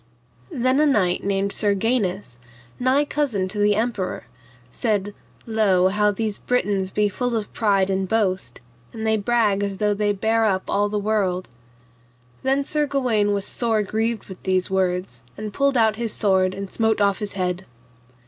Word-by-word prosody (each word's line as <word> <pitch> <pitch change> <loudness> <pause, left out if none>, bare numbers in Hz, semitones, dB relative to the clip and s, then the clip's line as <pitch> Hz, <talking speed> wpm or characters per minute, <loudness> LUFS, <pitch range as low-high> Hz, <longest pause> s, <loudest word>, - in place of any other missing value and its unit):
Then 255 +3 +1
a 305 - +4
knight 190 -10 +2
named 200 0 0
Sir 205 -2 +1
Gainus, 195 - -1 0.4
nigh 260 +4 +2
cousin 260 -11 -1
to 205 +2 -4
the 205 0 +3
emperor, 220 -4 -2 0.5
said, 205 - -1 0.3
Lo, 200 -5 +3
how 210 +1 +2
these 210 0 -2
Britons 200 -6 0
be 210 +2 +1
full 245 +4 -2
of 215 -2 -4
pride 200 -4 +2
and 190 0 -1
boast, 190 - -1 0.3
and 220 -1 -5
they 220 0 +3
brag 210 -2 +1
as 200 -1 -2
though 210 +1 +1
they 205 0 +1
bare 220 +3 +1
up 190 -3 +1
all 205 +1 +1
the 210 - -2
world. 200 -3 0 0.9
Then 270 +1 +1
Sir 300 +1 0
Gawaine 245 -7 +1
was 200 -1 -1
sore 225 -3 0
grieved 220 +2 -2
with 190 -2 -10
these 185 0 0
words, 180 -9 -1 0.2
and 210 0 -6
pulled 275 +1 +2
out 220 -2 +3
his 230 -2 -2
sword 190 -3 +1
and 195 0 -7
smote 220 -1 +1
off 200 -2 +2
his 210 -1 -4
head. 185 -1 -2
205 Hz, 170 wpm, -22 LUFS, 190-225 Hz, 0.9 s, a